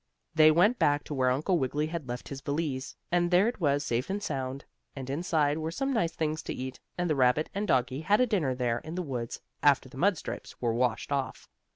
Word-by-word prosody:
So - - -51
they 155 -1 +7
went 185 +10 +4
back 145 0 +3
to - - -6
where 130 -2 +2
Uncle 155 +8 +1
Wiggily 145 +3 0
had 160 -3 -5
left 125 +1 -5
his 140 -1 -6
valise, 145 -2 -3 0.2
and 175 0 +2
there 180 +4 +5
it 240 - -3
was 145 -3 +1
safe 120 +4 -1
and 205 +1 -2
sound, 135 -3 -3 0.3
and 135 -2 -6
inside 155 -1 +1
it - - -3
were 160 0 -2
some 270 +11 -1
nice 170 -9 +1
things 155 0 -2
to - - -5
eat, 130 0 -6 0.2
and 175 0 0
the 155 - +1
rabbit 130 +3 +2
and 205 +2 -2
doggie 130 0 +1
had 205 +6 +3
a 250 - +5
dinner 175 - 0
there 120 -2 0
in 160 +2 -8
the 180 - -2
woods, 125 -6 -4 0.2
after 140 -2 +4
the 130 - -12
mud 195 +1 +3
stripes - - -7
were 120 -2 0
washed 120 +2 0
off. 135 -2 -2
145 Hz, 240 wpm, -29 LUFS, 130-175 Hz, 0.3 s, they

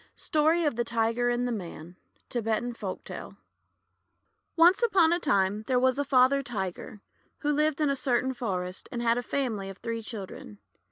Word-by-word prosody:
STORY 320 +1 +2
OF 290 -6 0
THE 240 - +1
TIGER 230 +1 0
AND 245 +1 0
THE - - -2
MAN 175 -5 -7 0.3
Tibetan 235 0 -1
Folktale 200 -5 -7 0.6
» - - -49
ONCE 345 +5 +6
upon 380 -8 +4
a 345 - +1
time, 205 - +1
there 255 - +2
was 260 +2 +2
a - - +2
Father 270 0 +4
Tiger 205 -3 -5 0.4
who 295 - +1
lived 300 0 +1
in 300 -2 +2
a - - 0
certain 260 -1 0
forest, 185 -7 -4
and 240 -1 -3
had 235 +1 +3
a - - -2
family 225 -6 -2
of 195 - -9
three 230 +2 -4
children. 195 - -8
240 Hz, 175 wpm, -28 LUFS, 215-280 Hz, 0.6 s, ONCE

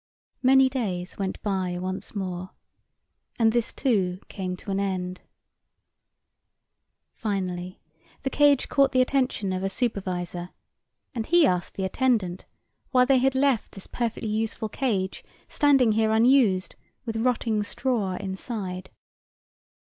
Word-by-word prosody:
Many 265 0 +6
days 200 -10 -3
went 190 -1 -2
by 185 -3 -1
once 185 +4 -5
more, 185 -1 -4 0.8
and 225 -2 +4
this, 235 0 0
too, 190 -9 0
came 185 -2 -4
to 200 - -7
an 195 - 0
end. 185 -2 -2 1.9
Finally 185 -4 -3 0.4
the 270 - -1
cage 290 -2 +4
caught 275 -2 +3
the 255 - +5
attention 255 -8 0
of 185 - -2
a 195 - -1
supervisor, 180 -6 -3 0.6
and 225 -3 -3
he 345 -1 +5
asked 180 -7 0
the 190 - -3
attendant 190 -4 0 0.4
why 250 -1 +4
they 265 0 +4
had 265 +1 +2
left 265 -4 +1
this 195 - -10
perfectly 230 -2 -3
useful 220 +1 -2
cage 200 -7 -2 0.2
standing 275 -6 +4
here 220 0 +2
unused 220 -5 +4 0.3
with 225 -2 -3
rotting 225 -2 +1
straw 210 -3 -1
inside. 190 -1 -5
210 Hz, 125 wpm, -26 LUFS, 185-250 Hz, 1.9 s, Many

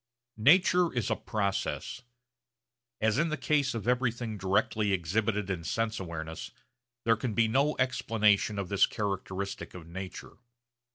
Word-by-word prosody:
Nature 180 +4 +5
is 120 -5 -1
a - - +3
process. 100 +3 -2 1.0
As 110 +3 +2
in 165 +1 +2
the 155 - -2
case 145 -5 +1
of 115 -1 -4
everything 120 -2 0
directly 100 +2 +1
exhibited 100 +3 0
in 85 -3 -3
sense 115 +6 -1
awareness, 80 -3 -6 0.6
there 115 0 +5
can 110 -1 -3
be 115 -1 +4
no 140 +6 +2
explanation 110 -5 +2
of 100 -2 -3
this 100 0 +4
characteristic 100 -2 -4
of 90 -3 -9
nature. 95 +2 -8
110 Hz, 135 wpm, -30 LUFS, 95-120 Hz, 1.0 s, Nature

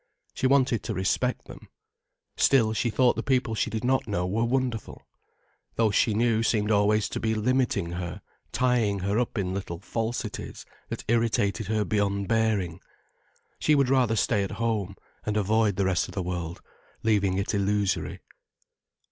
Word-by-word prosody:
She 130 - 0
wanted 130 -4 +3
to - - -4
respect 100 +7 0
them. - - -12 0.7
Still 115 -5 +3
she 120 +2 0
thought 125 +2 +3
the - - -2
people 130 -4 0
she 110 - 0
did 110 0 -4
not 130 0 +1
know 90 -4 -1
were 105 +5 0
wonderful. 125 -2 -2 0.7
Those 110 -2 +2
she 110 +1 +2
knew 115 0 +2
seemed 110 -2 +1
always 105 0 +3
to - - -4
be 110 0 0
limiting 110 -6 0
her, 90 +2 -5 0.3
tying 115 -6 +1
her 100 +4 0
up 125 -1 -2
in 95 -2 -1
little 95 -3 -4
falsities 115 +4 -4 0.2
that - - -5
irritated 110 -3 +1
her 110 -1 0
beyond 100 -2 0
bearing. 110 -7 0 0.8
She 155 - +3
would 140 -3 +3
rather 125 -4 +3
stay 105 -1 +1
at 100 - -3
home 110 -5 -2 0.3
and 105 0 -1
avoid 105 0 +2
the 100 0 0
rest 95 -2 +1
of - - -11
the 95 - -1
world, 85 -1 -4 0.4
leaving 100 -4 +2
it 100 +3 -1
illusory. 100 0 0
110 Hz, 165 wpm, -26 LUFS, 100-115 Hz, 0.8 s, wanted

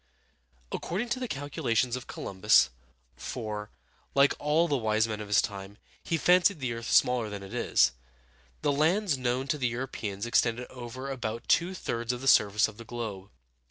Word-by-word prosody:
According 210 +8 -3
to 245 +2 -1
the 250 - -3
calculations 130 - -1
of 125 - -7
Columbus, 100 -6 +3 0.4
for, 105 -3 -5 0.5
like 140 0 +5
all 155 +3 +2
the 145 - +1
wise 110 -2 +1
men 110 -1 -4
of 105 - -7
his 100 0 +4
time, 100 0 -6 0.3
he 165 - 0
fancied 180 +1 +4
the 125 -3 -2
earth 115 0 -6
smaller 125 -3 +3
than 100 -1 -6
it 95 - -10
is, 65 0 +3 0.7
the - - +3
lands 165 +5 +2
known 130 +1 -1
to 150 - 0
the 130 - +1
Europeans 115 -4 -4
extended 120 +1 +1
over 130 +2 -7
about 115 -3 -4
two 175 +3 +2
thirds 115 -8 -2
of 125 0 -5
the 135 - -4
surface 105 -4 +5
of 110 -2 -12
the 115 - -9
globe. 110 -5 -6
120 Hz, 175 wpm, -29 LUFS, 110-140 Hz, 0.7 s, like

